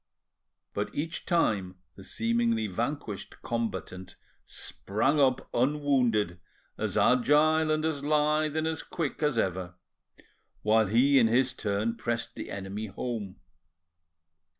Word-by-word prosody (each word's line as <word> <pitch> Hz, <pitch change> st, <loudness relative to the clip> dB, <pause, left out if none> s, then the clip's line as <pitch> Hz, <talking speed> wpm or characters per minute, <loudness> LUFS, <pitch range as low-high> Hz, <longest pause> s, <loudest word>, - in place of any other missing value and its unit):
But 105 Hz, +1 st, -2 dB
each 160 Hz, +3 st, -4 dB
time 100 Hz, -, +1 dB, 0.2 s
the 95 Hz, -, -12 dB
seemingly 115 Hz, +1 st, 0 dB
vanquished 110 Hz, +1 st, -4 dB
combatant 95 Hz, -5 st, -4 dB, 0.3 s
sprang 135 Hz, +9 st, -1 dB
up 130 Hz, -2 st, +2 dB
unwounded, 125 Hz, -9 st, +1 dB, 0.4 s
as -, -, -2 dB
agile 150 Hz, +5 st, +4 dB
and 155 Hz, 0 st, +1 dB
as 150 Hz, -3 st, -2 dB
lithe 150 Hz, +1 st, +2 dB
and 160 Hz, -, 0 dB
as 160 Hz, 0 st, -2 dB
quick 160 Hz, -4 st, -4 dB
as 150 Hz, -5 st, +1 dB
ever, 90 Hz, -3 st, -1 dB, 0.9 s
while 110 Hz, 0 st, +4 dB
he 130 Hz, +7 st, +5 dB
in 115 Hz, -, +5 dB
his 125 Hz, +2 st, +2 dB
turn 110 Hz, 0 st, -1 dB
pressed 115 Hz, 0 st, -3 dB
the -, -, -7 dB
enemy 100 Hz, +2 st, -5 dB
home. 105 Hz, -2 st, -5 dB
120 Hz, 120 wpm, -29 LUFS, 105-145 Hz, 0.9 s, he